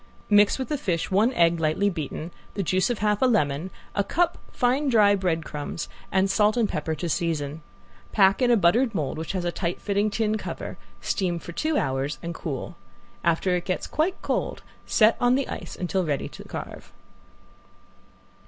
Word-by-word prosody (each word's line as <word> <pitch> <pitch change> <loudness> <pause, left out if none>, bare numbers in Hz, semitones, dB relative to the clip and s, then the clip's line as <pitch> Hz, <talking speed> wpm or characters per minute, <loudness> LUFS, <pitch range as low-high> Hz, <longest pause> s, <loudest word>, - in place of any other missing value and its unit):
Mix 205 0 +6
with 260 -3 -4
the 295 - -1
fish 170 -6 -1
one 210 +6 +4
egg 170 -4 +3
lightly 160 +6 +1
beaten, 160 -2 -4 0.2
the 200 - -1
juice 185 +7 +1
of 240 - 0
a - - -11
half 210 -1 +1
lemon, 180 - +2 0.2
a 200 - +1
cup 345 - +1
fine 265 +3 +1
dry 210 -4 +5
bread 175 -5 0
crumbs, 150 +2 -5 0.2
and 190 0 +3
salt 210 +3 +3
and 230 -3 +3
pepper 160 -1 -2
to 170 +3 -4
season. 160 -2 -1 0.5
Pack 195 +2 +4
in 250 - +4
a 240 - +5
buttered 220 +6 +3
mold 155 -1 -2
which 160 - -4
has 185 -2 -2
a 175 - 0
tight 175 0 -3
fitting 205 +1 +1
tin 215 0 0
cover, - - -6 0.3
steam 180 -3 0
for 170 - -8
two 310 - 0
hours, 135 +2 -1
and 170 0 -3
cool. 155 +1 -5 0.5
After 170 +2 +2
it 175 - -2
gets 185 - -2
quite 335 +5 0
cold - - -2 0.2
set 220 +1 +5
on 245 +1 +4
the 275 0 0
ice - - -6
until 185 +1 0
ready 145 -5 -1
to - - -11
carve. - - -8
190 Hz, 185 wpm, -25 LUFS, 165-220 Hz, 0.5 s, Mix